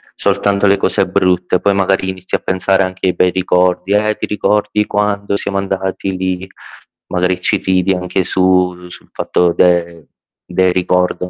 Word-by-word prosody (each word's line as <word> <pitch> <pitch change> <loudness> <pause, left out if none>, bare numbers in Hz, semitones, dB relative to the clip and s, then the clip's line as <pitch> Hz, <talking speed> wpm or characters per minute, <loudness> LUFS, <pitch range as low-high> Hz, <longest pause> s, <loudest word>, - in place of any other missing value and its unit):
soltanto 100 0 0
alle 100 0 +4
cose - - 0
brutte, 90 0 +1
poi 100 -1 +2
magari 95 -1 +1
inizi 95 -1 -9
a - - -1
pensare 95 +1 0
anche 95 0 -4
ai 90 - +2
bei 90 - +2
ricordi. 90 +1 +1
Eh 105 +1 +1
ti - - -3
ricordi 105 +1 0
quando 100 -1 -1
siamo 100 -1 -3
andati 95 -1 -3
lì, 95 0 -3 0.6
magari 90 0 0
ci - - +1
ridi 95 0 +1
anche 90 +1 -1
su 90 -1 +1
sul - - -14
fatto 85 -1 0
del 85 -2 +1 0.4
del 95 -1 +1
ricordo, 90 0 0
95 Hz, 160 wpm, -15 LUFS, 90-100 Hz, 0.6 s, alle